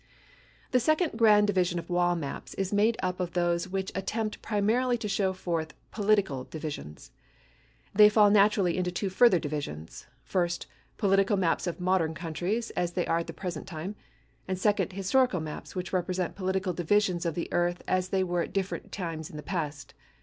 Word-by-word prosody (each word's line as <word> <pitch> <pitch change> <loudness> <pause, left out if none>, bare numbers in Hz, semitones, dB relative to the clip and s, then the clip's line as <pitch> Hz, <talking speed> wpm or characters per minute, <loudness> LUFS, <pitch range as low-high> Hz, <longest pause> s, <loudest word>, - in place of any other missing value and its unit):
The 255 - +4
second 310 +6 +2
grand 210 -2 +6
division 185 -3 +1
of 170 - -5
wall 175 0 +2
maps 145 -5 -6
is 195 0 -2
made 215 +3 +3
up 185 0 -1
of 180 -2 -3
those 175 0 +1
which 190 0 -3
attempt 210 +4 -3
primarily 225 +4 +1
to 225 -2 -4
show 195 -1 +1
forth 170 -4 -3 0.2
political 200 - +1
divisions. 145 - -7 0.8
They 210 +1 +8
fall 210 -1 +5
naturally 200 -4 +4
into 180 -1 0
two 190 +2 -2
further 195 -1 +5
divisions; 145 - -5 0.2
first, 175 -2 -1 0.3
political 195 0 +3
maps 180 -1 +1
of 175 - -3
modern 180 -3 +1
countries 180 +8 -2
as 175 -1 -2
they 180 -1 0
are 165 - +1
at 170 - -4
the - - -6
present 180 -3 -5
time, 180 +3 -5 0.5
and 190 -1 -1
second, 205 0 +1
historical 200 +2 +2
maps 155 +3 -7
which 180 +1 -4
represent 185 0 -1
political 190 -1 -1
divisions 180 +1 +1
of 165 -3 -1
the 170 - -2
earth 175 0 0
as 185 0 0
they 190 0 +1
were 175 -1 0
at - - -5
different 195 -1 -3
times 165 -5 -4
in 150 - -9
the 150 - -7
past. 150 -5 -4
185 Hz, 180 wpm, -28 LUFS, 170-205 Hz, 0.8 s, They